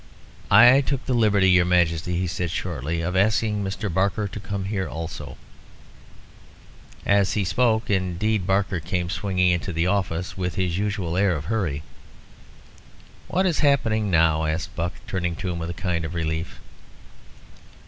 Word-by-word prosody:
"I 130 +3 +8
took 135 -1 -3
the 130 - -1
liberty, 105 -5 +4
your 90 -1 +5
Majesty," 85 -1 +1
he 90 - 0
said 85 +1 -2
shortly, 85 -1 -3
"of 90 +2 -2
asking 105 +1 +1
Mr. 100 +2 -3
Barker 100 +3 0
to 105 - -7
come 100 -1 -4
here 95 -2 -2
also." 80 -4 -7 1.7
As 100 -1 +3
he 105 - 0
spoke, 110 +4 +1
indeed, 95 +1 0
Barker 95 -1 +1
came 90 +1 -3
swinging 90 -3 +1
into 90 +1 -1
the 85 0 0
office, 90 -2 -1
with 90 -1 -3
his 90 -3 -1
usual 100 -5 -2
air 95 -2 +2
of 75 -1 -5
hurry. 80 -8 -2 1.4
"What 190 +2 +1
is 175 -4 +1
happening 115 -8 +2
now?" 80 -2 +3
asked 85 +2 -3
Buck, 85 0 -2
turning 90 -3 -2
to 90 - -4
him 85 - -4
with 85 0 -4
a - - -3
kind 85 -2 0
of 80 +2 -5
relief. 80 0 -3
90 Hz, 160 wpm, -24 LUFS, 85-100 Hz, 1.7 s, I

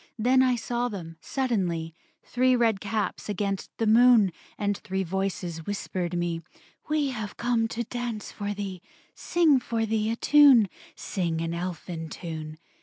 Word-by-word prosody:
Then 250 +4 +4
I 255 -1 +3
saw 240 +1 -1
them; 170 -7 -7
suddenly; 180 - -1 0.3
Three 255 +1 +2
red 225 -4 +2
caps 215 0 -2
against 200 -1 -2
the 225 - 0
moon; 225 -3 +6 0.3
And 205 0 0
three 190 -1 -3
voices 180 -3 -3
whispered 185 -3 -3
me, 170 -1 -1 0.5
"We 300 -2 +1
have 215 -5 -5
come 235 -1 +1
to 235 +1 -3
dance 235 -2 -5
for 205 -1 -4
thee, 195 -3 -5 0.3
Sing 320 -6 +3
for 230 -2 -1
thee 220 0 0
a 230 - 0
tune, 270 -6 +6 0.3
Sing 170 -4 -2
an 165 0 -2
elfin 170 -1 -5
tune." 155 -3 -6
205 Hz, 150 wpm, -27 LUFS, 175-240 Hz, 0.5 s, moon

